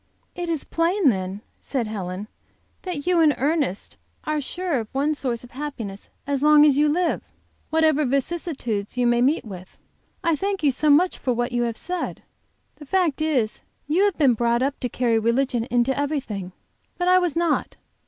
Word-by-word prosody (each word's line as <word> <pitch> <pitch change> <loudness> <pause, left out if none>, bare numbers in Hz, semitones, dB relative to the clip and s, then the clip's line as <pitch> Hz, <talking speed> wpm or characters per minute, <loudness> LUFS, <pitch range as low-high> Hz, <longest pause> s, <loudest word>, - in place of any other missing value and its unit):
"It 350 -1 -4
is 320 -4 -1
plain, 335 0 +2
then," 190 -1 -2 0.2
said 260 -5 -2
Helen, 200 -2 -5 0.5
"that 345 -7 -5
you 360 -1 +3
and 305 -4 +5
Ernest 285 - -1 0.3
are 305 -1 -1
sure 340 0 -2
of 220 - -5
one 285 +3 +1
source 250 -5 -3
of 245 - -13
happiness 240 -8 -6 0.2
as 280 -1 -1
long 300 0 +7
as 290 -3 +5
you 295 +1 +3
live, 345 +3 +1 0.5
whatever 315 -2 +3
vicissitudes 265 - -2
you 250 - +2
may 240 0 +3
meet 275 +4 +2
with. 185 -3 -10 0.5
I 335 -2 +2
thank 390 +2 -2
you 285 - +4
so 300 +4 0
much 340 +6 +4
for 250 - 0
what 240 +1 -1
you 240 0 0
have 225 - -7
said. 360 +1 -4 0.5
The 295 - -11
fact 340 -4 +1
is 265 -9 0 0.2
you 340 +7 +2
have 405 -4 0
been 275 -5 +4
brought 235 +2 +1
up 280 +1 -1
to 250 - -2
carry 235 -3 +1
religion 235 +1 +1
into 245 +1 +1
everything. 265 -11 -3 0.4
But 355 -1 -1
I 365 0 +6
was 355 -4 -1
not. 335 -2 0
280 Hz, 185 wpm, -23 LUFS, 240-320 Hz, 0.5 s, long